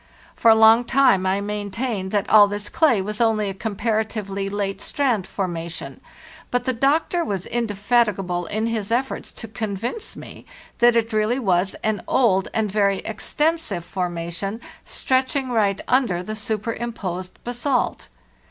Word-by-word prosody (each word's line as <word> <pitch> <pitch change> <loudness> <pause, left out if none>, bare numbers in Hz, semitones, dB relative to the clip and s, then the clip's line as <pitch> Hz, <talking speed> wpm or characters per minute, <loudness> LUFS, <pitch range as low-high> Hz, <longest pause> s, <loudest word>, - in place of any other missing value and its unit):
For 230 - +4
a 220 - +8
long 220 +2 +7
time 235 -7 +3
I 195 +1 +1
maintained 205 0 -3
that 205 0 0
all 210 -1 +7
this 205 +1 -4
clay 245 - +3
was 210 +3 -4
only 215 -3 +2
a - - -6
comparatively 210 -1 -2
late 200 -1 -3
strand 245 -10 0
formation; 170 -3 -5 0.5
but 245 0 0
the 260 - 0
doctor 300 +7 +1
was 195 - -3
indefatigable 205 -5 0
in 215 +5 -1
his 225 -2 -2
efforts 255 +3 -1
to 225 - -8
convince 220 - -4
me - - -11 0.3
that 240 -1 +5
it 230 -1 +1
really 215 +3 +1
was 190 -6 +1
an 215 -1 0
old 195 -7 +3
and 215 -3 -1
very 200 -1 +2
extensive 295 - -1
formation, 175 +3 -4 0.3
stretching 260 0 0
right 205 -4 +2
under 235 -9 +2
the 215 +3 -5
superimposed 215 -4 -4
basalt. 245 +2 -1
215 Hz, 145 wpm, -22 LUFS, 195-240 Hz, 0.5 s, a